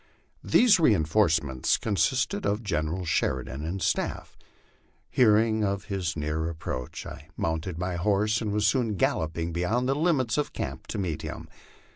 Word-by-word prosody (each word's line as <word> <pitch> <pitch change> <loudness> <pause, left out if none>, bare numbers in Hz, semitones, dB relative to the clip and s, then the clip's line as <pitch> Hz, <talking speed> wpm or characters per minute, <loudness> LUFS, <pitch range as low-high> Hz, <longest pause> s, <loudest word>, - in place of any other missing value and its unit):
These 235 -6 +5
reinforcements 80 - +2
consisted 105 +3 0
of 105 +3 -1
General 85 -1 -2
Sheridan 65 -3 -1
and 85 +3 -3
staff. - - -2 0.8
Hearing 110 -1 +4
of 100 0 -1
his 90 -5 -2
near 75 +2 -1
approach, 70 -6 -5
I 75 - -10
mounted 80 +1 -2
my 90 0 -2
horse 105 +4 +1
and 105 -2 -2
was 105 0 +1
soon 115 -1 +2
galloping 80 -1 -1
beyond 110 +9 0
the 135 - +2
limits 145 -5 +1
of 150 - -2
camp - - -5
to - - -4
meet 90 -6 -2
him. - - -7
95 Hz, 145 wpm, -27 LUFS, 80-110 Hz, 0.8 s, These